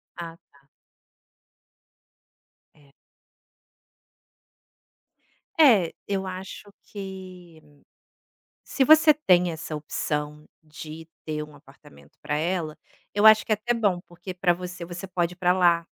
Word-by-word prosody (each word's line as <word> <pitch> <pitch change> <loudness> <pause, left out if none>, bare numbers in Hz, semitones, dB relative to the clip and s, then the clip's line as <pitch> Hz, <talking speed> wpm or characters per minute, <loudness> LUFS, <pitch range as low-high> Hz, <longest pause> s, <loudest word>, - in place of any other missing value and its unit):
Ah 165 -1 -8
tá. 140 - -24 2.1
É. 145 -2 -24 2.7
É, 220 - +5
eu 195 -1 -2
acho 190 +2 -8
que 185 -4 -10 1.0
se 270 - 0
você 310 +2 +7
tem 180 - +3
essa 160 -1 -6
opção 150 0 -4 0.2
de 155 +1 -10 0.2
ter 150 -1 -3
um 150 -1 -13
apartamento 70 - -19
para 150 - -2
ela, 165 -1 -2 0.4
eu 205 +1 +2
acho 215 0 +8
que - - -5
é - - +5
até 240 +3 -1
bom, 205 -6 +1
porque 175 +2 -9
para 180 -1 +2
você, 180 0 -7
você 175 +2 -7
pode 175 -1 -1
ir - - -20
para 180 0 +2
lá. 170 -2 +3
175 Hz, 120 wpm, -25 LUFS, 155-190 Hz, 2.7 s, acho